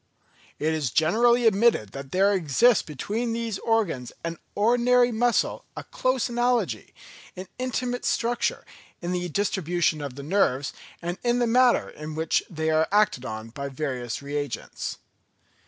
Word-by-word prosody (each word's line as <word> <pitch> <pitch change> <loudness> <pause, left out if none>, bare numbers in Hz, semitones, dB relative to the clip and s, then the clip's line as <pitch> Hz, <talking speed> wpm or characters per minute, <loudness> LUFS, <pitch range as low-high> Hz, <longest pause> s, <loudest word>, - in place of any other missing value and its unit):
It 155 +2 0
is 150 -5 -1
generally 235 - +3
admitted 215 - +3
that 135 +2 -8
there 195 +2 +3
exists 195 - +4
between 215 - -3
these 230 -3 -3
organs 200 - 0
and 165 -1 -4 0.2
ordinary 245 +3 +4
muscle 235 +1 +1
a - - -5
close 255 -1 0
analogy, 240 0 -1 0.4
in 185 +1 -7
intimate 250 -1 -2
structure, 235 +1 0 0.3
in 175 0 -4
the 180 -1 -2
distribution 175 -4 0
of 140 -3 -6
the 140 - -8
nerves, 145 -5 +1 0.3
and 175 +2 -3
in 240 0 +2
the 245 - +2
manner 245 +1 +4
in 150 0 -8
which 160 0 +1
they 160 -2 -1
are 155 0 +3
acted 205 -11 +2
on 110 0 -6
by 140 +3 -5
various 130 -3 -4
reagents. 145 -3 -4
185 Hz, 145 wpm, -25 LUFS, 150-235 Hz, 0.4 s, exists